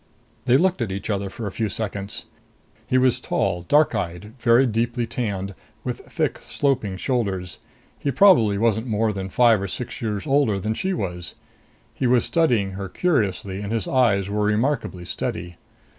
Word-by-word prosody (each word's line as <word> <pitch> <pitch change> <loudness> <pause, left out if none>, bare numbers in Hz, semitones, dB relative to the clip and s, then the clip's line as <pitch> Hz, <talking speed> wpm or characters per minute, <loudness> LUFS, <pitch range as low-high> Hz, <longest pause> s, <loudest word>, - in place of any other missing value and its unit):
They 130 0 +5
looked 185 -2 +1
at 110 -5 -1
each 100 +3 -3
other 100 -1 -2
for 110 +3 -7
a 100 - -3
few 110 +1 -2
seconds. 100 -1 -4 0.6
He 130 - +2
was 130 -1 +3
tall, 90 -7 -1
dark 145 - +3
eyed, 90 +4 -4
very 120 +2 +5
deeply 120 +1 0
tanned, 100 -5 -3 0.3
with - - -3
thick - - -1
sloping 130 -9 -1
shoulders. 95 -6 -2 0.4
He - - -1
probably 125 - +5
wasn't 110 +2 +1
more 110 -1 +1
than 95 -1 -4
five 115 -1 +4
or 100 - -2
six 120 +6 -4
years 105 -3 -2
older 135 -8 +2
than 110 +3 -1
she 190 +12 -2
was. 90 - -4 0.6
He 130 - -1
was 125 -1 +3
studying 120 - +2
her 95 0 -6
curiously, 100 - 0
and 105 0 -4
his 115 -5 -1
eyes 115 -7 +2
were 105 +1 -1
remarkably 105 -4 0
steady. 85 0 -4
110 Hz, 170 wpm, -23 LUFS, 100-125 Hz, 0.6 s, They